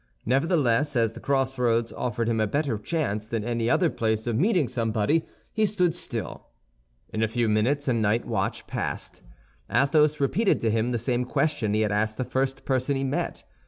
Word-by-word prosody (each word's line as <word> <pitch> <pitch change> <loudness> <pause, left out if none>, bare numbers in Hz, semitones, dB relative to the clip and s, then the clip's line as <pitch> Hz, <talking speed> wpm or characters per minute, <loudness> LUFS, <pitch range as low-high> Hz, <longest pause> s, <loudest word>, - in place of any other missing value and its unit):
Nevertheless, 140 - +2
as 115 -2 +2
the - - -9
crossroads 125 -4 0
offered 120 -2 -2
him 115 -1 +1
a 110 - +2
better 140 -3 -1
chance 110 -5 -2
than 115 -2 -2
any 115 0 -1
other 180 - +3
place 110 -1 -1
of 120 -2 -1
meeting 175 - +2
somebody, 115 +5 0 0.3
he 220 -1 +2
stood 180 -4 +1
still. - - -5 0.7
In 110 - -1
a 110 - +3
few 115 +1 0
minutes 120 +7 +1
a 130 - +3
night 110 0 +1
watch - - -2
passed. - - -5 0.5
Athos 150 +3 +3
repeated 190 - +2
to 115 - +1
him 115 +2 0
the 120 - 0
same 120 +2 0
question 125 -5 0
he 110 - +2
had 105 -1 +1
asked 110 +1 0
the 130 - -1
first 135 +1 -2
person 130 +1 0
he 135 - -1
met. 145 +6 -2
125 Hz, 185 wpm, -26 LUFS, 110-145 Hz, 0.7 s, other